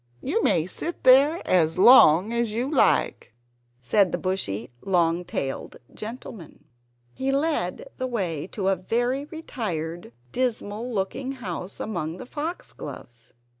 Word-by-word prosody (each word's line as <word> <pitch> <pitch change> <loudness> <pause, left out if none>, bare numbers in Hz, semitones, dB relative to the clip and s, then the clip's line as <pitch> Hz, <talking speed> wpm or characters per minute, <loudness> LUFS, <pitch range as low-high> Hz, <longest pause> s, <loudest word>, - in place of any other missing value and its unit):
You 365 +12 0
may 165 - +3
sit 335 - -4
there 275 +6 +6
as 165 -3 +3
long 200 -3 +7
as 235 -2 0
you 245 +6 -2
like," 250 - +1 0.5
said 190 - +3
the - - -1
bushy 125 - -2
long 175 -2 +1
tailed 135 -5 -4 0.2
gentleman. 215 - -9 0.5
He 265 - -1
led 315 - -1
the 255 - -2
way 180 - -3
to 195 -1 -2
a 195 - +3
very 240 +9 -1
retired, 180 - -5 0.2
dismal 235 -2 -2
looking 250 +6 -2
house 190 -6 -6
amongst 170 -5 -4
the - - -8
foxgloves. 255 - -7
210 Hz, 130 wpm, -25 LUFS, 170-260 Hz, 0.5 s, long